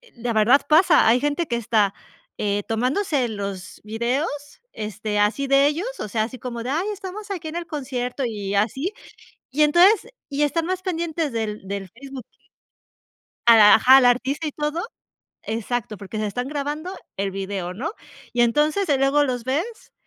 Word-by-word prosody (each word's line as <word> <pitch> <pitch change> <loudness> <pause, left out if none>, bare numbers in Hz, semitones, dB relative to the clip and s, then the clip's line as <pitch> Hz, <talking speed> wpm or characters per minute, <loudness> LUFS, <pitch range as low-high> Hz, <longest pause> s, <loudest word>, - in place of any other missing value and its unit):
la 235 -1 -3
verdad 225 +6 +5
pasa, 320 - +5
hay 235 +3 +5
gente 295 +3 -1
que 240 - -1
está 215 -3 +1 0.4
eh, 205 0 -1
tomándose 255 - 0
los 200 -3 -6
videos, 235 +8 -1 0.5
este, 210 0 -3
así 225 +7 +1
de 275 +1 +5
ellos, 330 +10 -1
o - - -4
sea, 215 0 0
así 250 +3 -6
como 235 -1 -5
de: 250 - -4
"Ay, 340 +7 0
estamos 405 +1 -8
aquí 345 -5 -4
en 315 - -8
el 345 - -4
concierto", 260 -3 -3
y 205 -3 -4
así. 265 - 0 0.6
Y 295 +3 +1
entonces 365 +9 +5 0.2
y 285 +1 -1
están 325 +3 0
más 370 +1 -2
pendientes 330 -5 -2
del 215 -3 -4
del 200 -1 -4
Facebook 265 +1 -10
y, - - -37 1.1
a 230 -1 +9
la 210 -1 +8
ajá, 260 +1 +7
al 260 - +5
artista 265 +5 +1
y - - -3
todo. 300 +3 -2 0.6
Exacto, 225 0 -3
porque 205 +2 -7
se 215 - -1
están 245 +5 -3
grabando 300 +5 -4 0.2
el 195 0 -1
video, 190 -2 -4
¿no? 290 - -4 0.4
Y 240 - +3
entonces, 300 +10 +2
eh, 280 -3 +3
luego 280 +2 +3
los 245 -3 -3
ves 330 - -3
260 Hz, 175 wpm, -23 LUFS, 220-305 Hz, 1.1 s, a